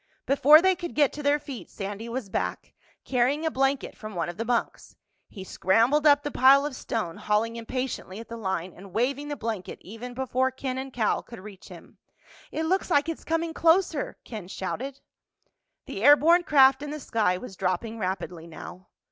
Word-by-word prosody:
Before 295 Hz, +4 st, +6 dB
they 375 Hz, 0 st, +5 dB
could 345 Hz, -1 st, -7 dB
get 290 Hz, -3 st, +3 dB
to 295 Hz, -, -6 dB
their 290 Hz, 0 st, +3 dB
feet 275 Hz, -4 st, -9 dB
Sandy 205 Hz, +3 st, -6 dB
was 240 Hz, -2 st, -4 dB
back, 195 Hz, -, -4 dB, 0.3 s
carrying 270 Hz, +5 st, +1 dB
a 320 Hz, -, +1 dB
blanket 270 Hz, 0 st, 0 dB
from 215 Hz, -2 st, -9 dB
one 170 Hz, -1 st, -2 dB
of 175 Hz, -, -8 dB
the 230 Hz, -, -2 dB
bunks. 235 Hz, 0 st, -2 dB, 0.3 s
He 195 Hz, -, -9 dB
scrambled 230 Hz, +12 st, +2 dB
up 290 Hz, 0 st, +5 dB
the 290 Hz, -, -3 dB
pile 275 Hz, +2 st, +6 dB
of 295 Hz, -3 st, -4 dB
stone, 195 Hz, -11 st, -4 dB
hauling 215 Hz, +2 st, 0 dB
impatiently 235 Hz, -4 st, -5 dB
at 225 Hz, -, -9 dB
the 230 Hz, -, -7 dB
line 190 Hz, -5 st, -3 dB
and 190 Hz, 0 st, -14 dB
waving 275 Hz, +5 st, -1 dB
the 295 Hz, -, -3 dB
blanket 220 Hz, -7 st, -5 dB
even 235 Hz, +5 st, -9 dB
before 260 Hz, 0 st, 0 dB
Ken 260 Hz, 0 st, -4 dB
and 265 Hz, 0 st, -6 dB
Cal 225 Hz, -4 st, 0 dB
could 235 Hz, -, -12 dB
reach 200 Hz, -1 st, -12 dB
him. -, -, -14 dB, 0.5 s
"It 320 Hz, -, -2 dB
looks 375 Hz, +4 st, 0 dB
like 300 Hz, -1 st, +2 dB
it's 330 Hz, -, -5 dB
coming 330 Hz, 0 st, -1 dB
closer!" 330 Hz, -2 st, +2 dB
Ken 215 Hz, -6 st, -8 dB
shouted. 260 Hz, +9 st, -5 dB, 0.8 s
The 195 Hz, -, -6 dB
air 290 Hz, +3 st, +9 dB
borne 335 Hz, +4 st, +4 dB
craft 270 Hz, -2 st, +5 dB
in 295 Hz, -, -5 dB
the 305 Hz, +1 st, -5 dB
sky 215 Hz, -9 st, 0 dB
was 195 Hz, -1 st, -9 dB
dropping 195 Hz, +5 st, -2 dB
rapidly 180 Hz, -3 st, -4 dB
now. 180 Hz, +3 st, -11 dB
250 Hz, 190 wpm, -26 LUFS, 210-290 Hz, 0.8 s, air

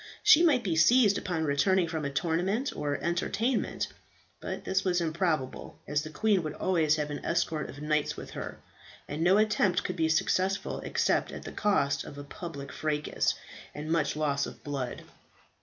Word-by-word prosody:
She 380 Hz, -6 st, +8 dB
might 290 Hz, -8 st, +4 dB
be 175 Hz, -5 st, 0 dB
seized 205 Hz, +5 st, +5 dB
upon 175 Hz, -4 st, -2 dB
returning 170 Hz, +5 st, +2 dB
from 160 Hz, -2 st, -3 dB
a -, -, 0 dB
tournament 180 Hz, -, 0 dB
or 145 Hz, -1 st, -1 dB
entertainment; 215 Hz, -, 0 dB, 0.5 s
but -, -, -5 dB
this 190 Hz, 0 st, +1 dB
was 180 Hz, -2 st, +1 dB
improbable, 160 Hz, -5 st, -2 dB
as 150 Hz, 0 st, +1 dB
the 155 Hz, -, -7 dB
queen 205 Hz, +4 st, +2 dB
would 155 Hz, -2 st, -5 dB
always 160 Hz, -5 st, +2 dB
have 150 Hz, -1 st, -2 dB
an 145 Hz, -, -5 dB
escort 160 Hz, -2 st, -1 dB
of 145 Hz, +2 st, -9 dB
knights 150 Hz, -1 st, 0 dB
with -, -, -8 dB
her, -, -, -6 dB, 0.5 s
and 150 Hz, +2 st, -4 dB
no 185 Hz, +3 st, +5 dB
attempt 210 Hz, -3 st, +2 dB
could 185 Hz, -, -3 dB
be 160 Hz, -2 st, +1 dB
successful 185 Hz, +4 st, +1 dB
except -, -, 0 dB
at -, -, -8 dB
the -, -, -7 dB
cost 140 Hz, -9 st, +1 dB
of 145 Hz, -, -10 dB
a 145 Hz, -, -6 dB
public 145 Hz, -3 st, -7 dB
fracas 150 Hz, -1 st, -1 dB, 0.4 s
and 150 Hz, +2 st, -5 dB
much 155 Hz, -4 st, +1 dB
loss 145 Hz, -2 st, 0 dB
of -, -, -11 dB
blood. 135 Hz, -4 st, -4 dB
160 Hz, 175 wpm, -29 LUFS, 150-190 Hz, 0.5 s, She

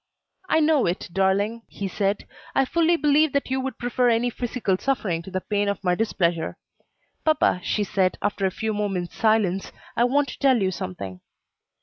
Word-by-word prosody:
"I 320 Hz, -, +4 dB
know 305 Hz, -, +3 dB
it, 175 Hz, +1 st, -2 dB
darling," 200 Hz, +4 st, +1 dB
he 200 Hz, -, -5 dB
said, 200 Hz, +1 st, -1 dB, 0.3 s
"I 270 Hz, -, +4 dB
fully 335 Hz, +4 st, +3 dB
believe 300 Hz, -1 st, +3 dB
that 280 Hz, -2 st, -1 dB
you 265 Hz, 0 st, +1 dB
would 265 Hz, 0 st, -4 dB
prefer 245 Hz, 0 st, +1 dB
any 235 Hz, +1 st, +2 dB
physical 230 Hz, -6 st, -1 dB
suffering 205 Hz, -11 st, -1 dB
to 170 Hz, -, -10 dB
the 185 Hz, 0 st, -3 dB
pain 205 Hz, 0 st, 0 dB
of 200 Hz, -1 st, -3 dB
my 180 Hz, -1 st, +2 dB
displeasure." 175 Hz, -5 st, 0 dB, 0.7 s
"Papa," 310 Hz, -12 st, +2 dB
she 210 Hz, -, 0 dB
said, 190 Hz, -2 st, +1 dB
after 200 Hz, -1 st, 0 dB
a -, -, +1 dB
few 220 Hz, +4 st, -3 dB
moments' 195 Hz, -4 st, -2 dB
silence, 210 Hz, -4 st, +1 dB, 0.2 s
"I 235 Hz, -, +3 dB
want 280 Hz, +3 st, +2 dB
to -, -, -9 dB
tell 265 Hz, -4 st, +4 dB
you 190 Hz, -2 st, +1 dB
something." 95 Hz, -, -6 dB
210 Hz, 185 wpm, -24 LUFS, 190-260 Hz, 0.7 s, I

